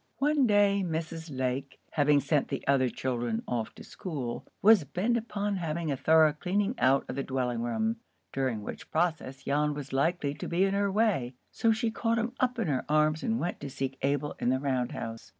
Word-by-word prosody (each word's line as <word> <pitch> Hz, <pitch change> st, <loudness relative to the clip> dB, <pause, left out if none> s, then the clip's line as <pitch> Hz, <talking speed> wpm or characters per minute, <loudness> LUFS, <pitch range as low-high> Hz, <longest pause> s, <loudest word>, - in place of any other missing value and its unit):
One 285 Hz, -2 st, +3 dB
day 205 Hz, -1 st, +4 dB
Mrs. 165 Hz, -1 st, -4 dB
Lake, 130 Hz, 0 st, -3 dB
having 145 Hz, -1 st, +3 dB
sent 145 Hz, +1 st, +1 dB
the 135 Hz, -, -4 dB
other 135 Hz, -2 st, +3 dB
children 120 Hz, -3 st, -2 dB
off 115 Hz, -3 st, -3 dB
to -, -, -11 dB
school, 140 Hz, -10 st, -5 dB
was 215 Hz, -4 st, +6 dB
bent 180 Hz, -, 0 dB
upon 205 Hz, -3 st, -2 dB
having 165 Hz, -2 st, -2 dB
a -, -, 0 dB
thorough 155 Hz, +2 st, +5 dB
cleaning 200 Hz, +7 st, 0 dB
out 135 Hz, +1 st, +3 dB
of -, -, -5 dB
the 140 Hz, -, -1 dB
dwelling 125 Hz, -3 st, -1 dB
room, 220 Hz, -, -1 dB, 0.4 s
during 130 Hz, -6 st, -1 dB
which -, -, -8 dB
process 160 Hz, -5 st, -1 dB
Jan 150 Hz, +1 st, +1 dB
was 140 Hz, -2 st, -7 dB
likely 145 Hz, +1 st, +1 dB
to -, -, -6 dB
be 175 Hz, +2 st, +2 dB
in 195 Hz, 0 st, +2 dB
her 200 Hz, 0 st, +1 dB
way; 190 Hz, -, +1 dB, 0.2 s
so 230 Hz, -, +2 dB
she 225 Hz, +1 st, 0 dB
caught 230 Hz, 0 st, 0 dB
him 230 Hz, +2 st, -1 dB
up 250 Hz, -1 st, +1 dB
in 225 Hz, -6 st, -1 dB
her 135 Hz, -4 st, 0 dB
arms 155 Hz, +1 st, +3 dB
and 230 Hz, 0 st, 0 dB
went 175 Hz, -, -3 dB
to 140 Hz, -, -6 dB
seek 135 Hz, 0 st, -4 dB
Abel 145 Hz, +1 st, 0 dB
in -, -, +1 dB
the 130 Hz, +1 st, +2 dB
round 130 Hz, -3 st, -1 dB
house. 115 Hz, 0 st, -6 dB
150 Hz, 205 wpm, -29 LUFS, 135-200 Hz, 0.4 s, was